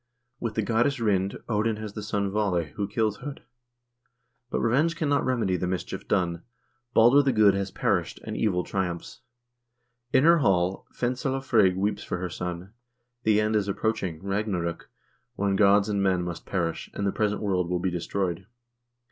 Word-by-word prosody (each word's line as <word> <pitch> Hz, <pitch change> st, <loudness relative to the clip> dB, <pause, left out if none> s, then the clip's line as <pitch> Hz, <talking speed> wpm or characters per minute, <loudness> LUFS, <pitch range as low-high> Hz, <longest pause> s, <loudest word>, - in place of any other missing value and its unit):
With 115 Hz, -2 st, -3 dB
the 110 Hz, -, +1 dB
goddess 120 Hz, +5 st, +1 dB
Rind, 100 Hz, -4 st, +1 dB
Odin 110 Hz, 0 st, +1 dB
has 105 Hz, -1 st, -7 dB
the 105 Hz, -, -5 dB
son 100 Hz, -2 st, -1 dB
Vaale, 95 Hz, -7 st, 0 dB
who 100 Hz, -, -3 dB
kills 105 Hz, 0 st, -1 dB
H0d. 145 Hz, +1 st, -7 dB, 1.1 s
But -, -, -1 dB
revenge 150 Hz, +9 st, +2 dB
cannot 145 Hz, -3 st, +1 dB
remedy 115 Hz, -8 st, +1 dB
the 90 Hz, -, -2 dB
mischief 90 Hz, -1 st, -4 dB
done. 85 Hz, -2 st, 0 dB, 0.5 s
Balder 120 Hz, +5 st, +7 dB
the 140 Hz, -1 st, +2 dB
Good 105 Hz, -4 st, +5 dB
has 100 Hz, 0 st, -2 dB
perished, -, -, -1 dB
and -, -, -5 dB
evil 90 Hz, -5 st, +1 dB
triumphs. 90 Hz, -3 st, -3 dB, 0.9 s
In 130 Hz, -, +4 dB
her 170 Hz, +1 st, +6 dB
hall 95 Hz, -6 st, +1 dB
Fensale 130 Hz, +2 st, -1 dB
Frigg 105 Hz, -8 st, +3 dB
weeps 100 Hz, +1 st, -1 dB
for -, -, -3 dB
her 90 Hz, 0 st, -3 dB
son; 90 Hz, +3 st, -5 dB, 0.5 s
the 110 Hz, -3 st, +3 dB
end 110 Hz, 0 st, +1 dB
is 105 Hz, -2 st, +1 dB
:■ -, -, -2 dB
approaching, 95 Hz, -7 st, -2 dB
Ragnarok,2 95 Hz, -4 st, -2 dB, 0.5 s
when 100 Hz, 0 st, 0 dB
gods 100 Hz, 0 st, +5 dB
and 100 Hz, -2 st, 0 dB
men 95 Hz, -2 st, +2 dB
must 85 Hz, -1 st, -6 dB
perish, 85 Hz, -4 st, -2 dB
and 100 Hz, -, -2 dB
the 100 Hz, -, +2 dB
present 105 Hz, 0 st, 0 dB
world 90 Hz, -4 st, 0 dB
will 90 Hz, -, +1 dB
be 90 Hz, +1 st, -1 dB
destroyed. 90 Hz, +1 st, -2 dB
100 Hz, 175 wpm, -26 LUFS, 90-110 Hz, 1.1 s, Balder